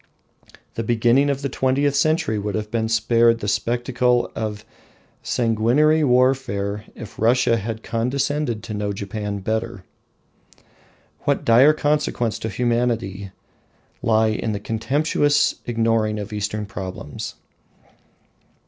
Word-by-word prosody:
The 115 - -3
beginning 120 +5 +3
of 140 0 -2
the - - +1
twentieth 135 +2 +1
century 155 - +1
would 105 0 -3
have 105 -1 -4
been 110 -1 -1
spared 115 +1 +3
the 105 - -4
spectacle 120 +2 0
of 105 -2 -4 0.6
sanguinary 125 +7 +2
warfare 125 -6 +1
if 110 - -10
Russia 115 +1 +3
had 110 +1 -5
condescended 125 +1 -1
to 110 - -6
know 105 -1 -2
Japan 100 0 -5
better. 110 -2 -3 1.4
What - - -1
dire 125 +6 +6
consequences 145 -7 0
to 110 - -4
humanity 115 -4 -1 0.7
lie 110 0 +3
in 110 0 -2
the 100 - -3
contemptuous 145 +7 +1
ignoring 115 -2 +1
of 105 +1 -6
Eastern 105 +1 -3
problems! 95 -6 -7
115 Hz, 115 wpm, -22 LUFS, 105-130 Hz, 1.4 s, dire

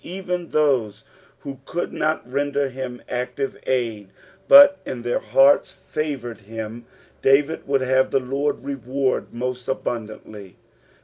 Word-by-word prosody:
Even 180 -1 -4
those 130 -9 +1 0.4
who 135 -1 -8
could 175 - -3
not 155 -4 -1
render 140 +1 -1
him 130 -1 -7
active 125 +2 -3
aid, 115 -6 -1 0.4
but 285 +1 +9
in 120 -2 -6
their 120 0 0
hearts 135 +1 +4
favoured 135 -7 -5
him, 110 +2 -8 0.3
David 140 +4 +2
would 135 -1 +1
have 130 0 +2
the 135 - +2
Lord 135 +3 -2
reward 135 -1 -2
most 125 +1 -4
abundantly. 110 -6 -5
130 Hz, 125 wpm, -22 LUFS, 120-145 Hz, 0.4 s, but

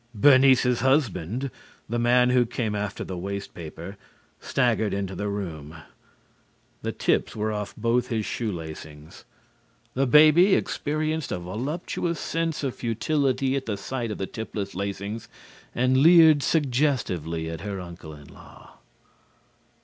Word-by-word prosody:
Bernice's 130 0 +5
husband, 130 - 0 0.4
the 120 +2 -2
man 125 +1 +4
who 125 -1 +4
came 115 -2 -3
after 105 -1 -3
the 95 - -6
waste 100 +2 -5
paper, 85 +4 -9 0.4
staggered 115 -6 0
into 100 -1 -3
the 105 +3 -3
room. 85 -7 -5 1.1
The - - -2
tips - - 0
were 110 0 -1
off 105 -1 -5
both 120 +3 +1
his 110 -4 -2
shoe 115 -3 -3
lacings. 80 -2 -9 0.7
The 135 +1 +1
baby 155 +8 +6
experienced 155 0 -2
a - - -1
voluptuous 140 - -3
sense 165 -2 -2
of 135 -3 -1
futility 135 +3 0
at 135 -3 -3
the 105 -3 -2
sight 120 +2 -4
of 105 - -4
the 95 - -3
tipless 105 -1 -6
lacings 100 +3 -4 0.5
and 130 +2 +2
leered 160 -1 +7
suggestively 125 - 0
at 80 -1 -6
her 100 -2 -4
uncle 85 -3 -9
in 75 -1 -14
law. - - -16
115 Hz, 135 wpm, -25 LUFS, 100-135 Hz, 1.1 s, leered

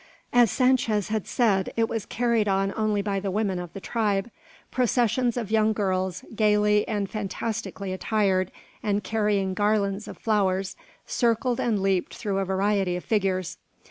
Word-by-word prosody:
As 240 -2 +6
Sanchez 245 -6 +2
had 215 -2 -2
said, 200 -6 +1
it 225 0 +3
was 225 -3 -4
carried 235 -2 +1
on 195 0 +1
only 215 -2 0
by 200 -1 -1
the 195 0 -3
women 195 -2 0
of 175 -2 -7
the - - -6
tribe. 205 0 -1 0.4
Processions 245 0 +1
of 220 -4 -3
young 220 0 +3
girls, 185 -3 -1
gaily 210 -1 +3
and 205 -3 -1
fantastically 200 -1 -4
attired, 190 -2 +1 0.3
and 205 0 0
carrying 210 -3 0
garlands 205 0 0
of - - -8
flowers, 195 -3 0 0.3
circled 240 0 +1
and 215 -5 0
leaped 190 -2 0
through 195 -2 -2
a 195 - 0
variety 190 -1 +1
of 180 - -6
figures. 190 -4 0
205 Hz, 155 wpm, -26 LUFS, 195-220 Hz, 0.4 s, As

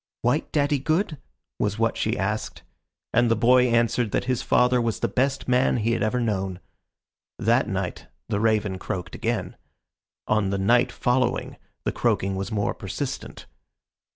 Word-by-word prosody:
"White 125 +6 +1
daddy 145 -1 +1
good?" 155 +2 0 0.4
was 105 0 0
what 115 0 +1
she 110 - -1
asked, 105 +4 -3 0.5
and 120 0 +4
the 115 - +4
boy 125 +3 +5
answered 115 0 +2
that - - +1
his 125 -1 -1
father 125 0 +3
was 115 -2 -1
the - - +1
best 135 +1 0
man 125 0 +3
he 115 0 0
had 115 - 0
ever 110 +4 +1
known. 95 -5 -1 0.8
That - - +2
night - - -3 0.2
the 100 -3 -1
raven 105 -3 +1
croaked 90 -1 -5
again. - - -2 0.7
On 110 -3 +2
the 100 - -1
night 120 +6 +3
following 125 0 0 0.3
the - - 0
croaking 95 0 0
was 95 +4 -4
more 105 -1 0
persistent. - - -5
115 Hz, 155 wpm, -25 LUFS, 105-125 Hz, 0.8 s, boy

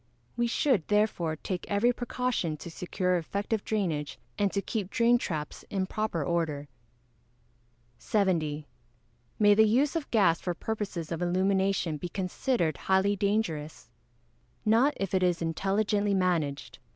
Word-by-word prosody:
We 240 0 +1
should, 235 - +1
therefore, 205 -6 +1
take 180 +3 -5
every 215 +5 +3
precaution 245 -9 -2
to 170 - -9
secure 180 +1 -1
effective 200 +5 -2
drainage, 165 -9 -2 0.2
and 200 -2 +1
to 200 - 0
keep 200 -1 -3
drain 235 +3 +3
traps 155 -8 -4
in 190 -2 -1
proper 200 -5 -2
order. 155 -3 -1 1.3
70. 165 -8 0 0.7
May 205 -1 +6
the 220 +1 +5
use 270 +8 +2
of 325 -3 -2
gas 185 -7 +3
for 175 -1 -2
purposes 195 -6 -4
of 165 - -3
illumination 190 -2 +1
be 175 +4 -5
considered 180 - -1
highly 190 +2 +2
dangerous? 160 - -2 0.7
Not 235 +7 +4
if 195 -1 -3
it 190 - +3
is 180 -2 +2
intelligently 200 +4 0
managed. 165 -7 -1
190 Hz, 135 wpm, -29 LUFS, 165-215 Hz, 1.3 s, May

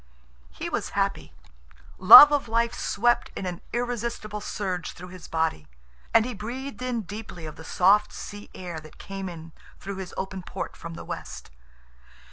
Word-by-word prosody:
He - - -6
was - - -4
happy. - - -1 0.7
Love 225 +10 +12
of 290 -4 +1
life 230 +1 +1
swept 240 +3 +1
in - - -5
an 180 -1 -5
irresistible 235 -3 -3
surge 185 -4 -4
through 180 +1 -11
his 185 -2 -11
body, 160 - -1 0.4
and 225 - +5
he 250 - -4
breathed 250 +6 -7
in 250 -2 -2
deeply 205 -4 -8
of 155 - -8
the 160 - -11
soft 195 +5 +3
sea 205 0 -9
air 175 -3 -6
that 155 0 -15
came 195 -1 -6
in 165 -1 -10 0.3
through 200 0 -7
his 190 -2 -7
open 190 0 -4
port - - -6
from 165 0 -8
the - - -9
west. - - -8
195 Hz, 165 wpm, -26 LUFS, 175-230 Hz, 0.7 s, Love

